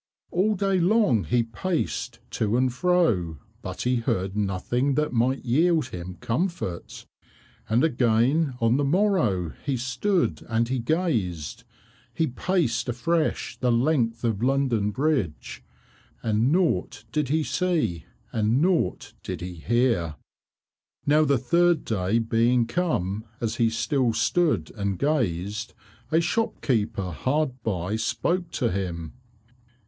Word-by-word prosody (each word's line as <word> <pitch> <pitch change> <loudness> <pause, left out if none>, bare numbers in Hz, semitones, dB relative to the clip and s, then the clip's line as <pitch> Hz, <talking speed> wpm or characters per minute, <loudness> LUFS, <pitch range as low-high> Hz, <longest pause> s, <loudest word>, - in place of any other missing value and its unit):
All 205 +5 +2
day 195 -1 +1
long 175 - +3
he 120 -1 +2
paced 165 +10 -3
to 110 +2 0
and 130 -1 +1
fro, 125 - +1 0.2
but - - -5
he 125 0 +2
heard 95 -4 -1
nothing 105 +7 0
that 150 -2 0
might 125 +4 +1
yield 160 +6 +2
him 90 0 -7
comfort. 120 - -3 0.6
And 115 +5 +3
again 130 +1 +2
on 115 +2 +3
the 145 - +1
morrow 140 - +1
he 140 -3 -1
stood 150 - 0
and 115 +1 +1
he 130 0 0
gazed 115 - -1 0.5
he 160 - +2
paced 130 -4 0
afresh 155 +7 -1
the 125 -1 +2
length 120 -2 +1
of 115 -3 0
London 125 -5 +1
Bridge, 125 - -2 0.6
but 110 - 0
naught 120 - +1
did 150 -2 -1
he 155 +2 +2
see 150 - -1 0.3
and 110 +3 +2
naught 175 +2 0
did 90 -3 -5
he 90 0 -5
hear. 95 -3 0 0.9
Now 155 +2 +4
the 140 -2 +3
third 170 +6 +2
day 100 0 0
being 115 +1 +2
come 110 - -1 0.2
as 115 -1 -2
he 115 -1 +3
still 125 +1 0
stood 120 - +1
and 100 -3 -2
gazed, 105 - -1 0.4
a 160 - +4
shopkeeper 120 - -1
hard 130 - -1
by 100 -1 -2
spoke 145 +11 -1
to 120 -5 0
him. 85 -4 -4
120 Hz, 130 wpm, -25 LUFS, 105-155 Hz, 0.9 s, Now